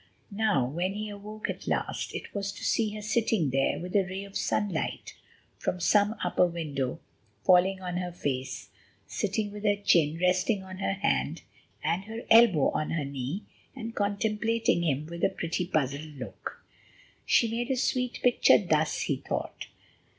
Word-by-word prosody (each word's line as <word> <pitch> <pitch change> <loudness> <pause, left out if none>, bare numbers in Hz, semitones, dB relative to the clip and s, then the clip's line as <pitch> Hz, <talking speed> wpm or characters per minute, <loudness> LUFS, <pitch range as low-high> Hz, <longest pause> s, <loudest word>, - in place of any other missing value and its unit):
Now, 200 - +2
when 175 +9 -2
he 215 0 -4
awoke 210 +1 -6
at - - -5
last, - - -2
it - - -6
was 200 -1 -2
to - - -10
see 215 -2 +1
her 210 - -6
sitting 215 - +1
there 135 +1 +2
with 180 +2 -6
a 200 - +6
ray 190 +2 -5
of 200 0 -12
sunlight 200 -6 -1 0.5
from 180 - -2
some 205 +4 +3
upper 180 0 +3
window 145 -7 -3 0.5
falling 190 +1 +5
on 180 -1 -3
her 180 -1 -3
face, 135 -6 -3 0.4
sitting 205 +1 -2
with 210 0 -8
her 205 -1 +3
chin 165 -6 +3
resting 185 +3 +2
on 185 0 -9
her 195 - 0
hand 70 - 0 0.4
and 170 +5 0
her 225 +2 -6
elbow 225 - +7
on 155 - -1
her 155 -4 -1
knee, 140 +7 -4 0.3
and 230 -3 -6
contemplating 215 0 +1
him 150 -3 0
with 170 +2 -7
a - - +5
pretty, 170 +1 -2
puzzled 150 -2 -1
look. 130 - -8 0.6
She 235 - +4
made 235 +3 -2
a 265 - +1
sweet 250 0 0
picture 245 -1 +6
thus, 160 -6 +1
he 140 - 0
thought. 140 - -4
185 Hz, 165 wpm, -28 LUFS, 160-210 Hz, 0.6 s, elbow